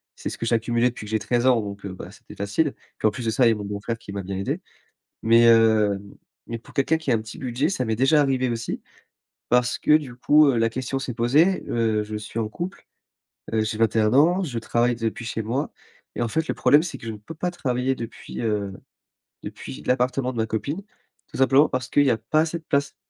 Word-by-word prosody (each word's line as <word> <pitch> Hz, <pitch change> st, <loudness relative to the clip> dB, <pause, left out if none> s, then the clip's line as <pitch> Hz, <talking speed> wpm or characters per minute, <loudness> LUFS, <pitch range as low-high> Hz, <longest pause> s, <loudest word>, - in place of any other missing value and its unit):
c'est -, -, -5 dB
ce -, -, -6 dB
que -, -, -4 dB
j'ai 115 Hz, 0 st, +2 dB
accumulé 120 Hz, +2 st, +1 dB
depuis 115 Hz, -3 st, -9 dB
que 105 Hz, -, -8 dB
j'ai 110 Hz, -, +1 dB
13 120 Hz, +3 st, 0 dB
ans 125 Hz, -3 st, +4 dB
donc 100 Hz, -1 st, -6 dB
bah, 95 Hz, -1 st, -8 dB
c'était -, -, -14 dB
facile. 105 Hz, +9 st, 0 dB, 0.2 s
Puis -, -, +2 dB
en -, -, +2 dB
plus 120 Hz, +3 st, -6 dB
de 110 Hz, -, +1 dB
ça, 125 Hz, +3 st, +3 dB
il -, -, +6 dB
y -, -, +4 dB
a -, -, -3 dB
mon 105 Hz, -, -6 dB
beau-frère 105 Hz, +3 st, -4 dB
qui 115 Hz, -3 st, -11 dB
m'a 100 Hz, 0 st, -4 dB
bien 95 Hz, +1 st, -4 dB
aidé. 95 Hz, -, -2 dB, 0.6 s
Mais, 115 Hz, +1 st, +5 dB
heu, 110 Hz, -3 st, +5 dB, 0.5 s
mais 115 Hz, -, -4 dB
pour 115 Hz, -, -17 dB
quelqu'un 140 Hz, +4 st, +2 dB
qui 160 Hz, -4 st, -3 dB
a -, -, +4 dB
un 115 Hz, -, +2 dB
petit 110 Hz, 0 st, -9 dB
budget, 130 Hz, +4 st, -1 dB
ça 155 Hz, -10 st, -1 dB
m'est 110 Hz, -2 st, -1 dB
déjà 135 Hz, +5 st, +4 dB
arrivé 130 Hz, -2 st, +1 dB
aussi. 115 Hz, -1 st, -3 dB, 0.7 s
Parce 125 Hz, 0 st, +2 dB
que -, -, +2 dB
du 140 Hz, -6 st, -5 dB
coup, 150 Hz, +5 st, +5 dB
heu, 125 Hz, -4 st, +2 dB
la 115 Hz, 0 st, +3 dB
question 130 Hz, +3 st, -3 dB
s'est 135 Hz, -2 st, -5 dB
posée. 145 Hz, +11 st, +3 dB
Heu, 110 Hz, -2 st, +1 dB
je 105 Hz, 0 st, -5 dB
suis 105 Hz, +2 st, -6 dB
en 110 Hz, -2 st, -1 dB
couple, 175 Hz, -, -6 dB, 0.7 s
heu 110 Hz, -, +1 dB
j'ai 110 Hz, 0 st, -3 dB
21 110 Hz, -1 st, +3 dB
ans, 175 Hz, +8 st, +4 dB
je 125 Hz, -8 st, -3 dB
travaille 120 Hz, +2 st, +1 dB
depuis 115 Hz, +1 st, -3 dB
chez 110 Hz, 0 st, -3 dB
moi 125 Hz, +7 st, -2 dB, 0.4 s
et -, -, -3 dB
en 120 Hz, -, +1 dB
fait 160 Hz, +7 st, -1 dB
le -, -, +1 dB
problème 150 Hz, +2 st, +4 dB
c'est 175 Hz, -, -5 dB
que 115 Hz, -, -10 dB
je -, -, -2 dB
ne -, -, -8 dB
peux 105 Hz, +10 st, -10 dB
pas 180 Hz, +3 st, -2 dB
travailler 130 Hz, -5 st, -1 dB
depuis, 110 Hz, -3 st, -7 dB
heu, 105 Hz, -4 st, -1 dB, 0.7 s
depuis 65 Hz, -1 st, -8 dB
l'appartement 125 Hz, +1 st, 0 dB
de 120 Hz, -, -6 dB
ma 110 Hz, -, +1 dB
copine. 140 Hz, -, -3 dB, 0.5 s
Tout -, -, -9 dB
simplement 135 Hz, +3 st, +5 dB
parce 130 Hz, 0 st, -3 dB
qu'il 145 Hz, -, +4 dB
y -, -, +4 dB
a 115 Hz, -, +3 dB
pas 155 Hz, +7 st, +1 dB
assez 165 Hz, +1 st, -1 dB
de 160 Hz, -, -21 dB
place. 140 Hz, -1 st, 0 dB
120 Hz, 245 wpm, -24 LUFS, 110-135 Hz, 0.7 s, il